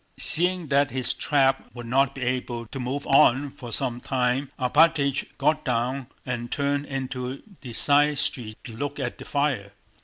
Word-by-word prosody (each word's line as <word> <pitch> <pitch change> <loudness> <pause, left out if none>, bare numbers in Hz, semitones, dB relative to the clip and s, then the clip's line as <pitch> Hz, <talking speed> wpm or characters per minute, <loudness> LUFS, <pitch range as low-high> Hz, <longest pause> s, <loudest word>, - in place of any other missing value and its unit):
Seeing 180 +1 +1
that 140 0 +3
his 130 0 +1
trap 135 -2 +2
would 120 -1 -7
not 135 +3 +2
be 135 - -4
able 120 -1 -2
to 135 +4 -7
move 130 +3 -3
on 135 0 +4
for 120 -2 -9
some 125 -1 -2
time, 130 +1 0
Alpátych 140 +1 +2
got 155 +2 +2
down 125 +1 -1 0.2
and 120 -2 -4
turned 145 0 0
into 130 -1 -4 0.2
the 125 -4 -8
side 145 +3 +3
street 110 -6 -2
to 115 - -9
look 145 +4 -4
at - - -3
the - - -9
fire. 135 -9 -1
135 Hz, 165 wpm, -25 LUFS, 125-145 Hz, 0.2 s, on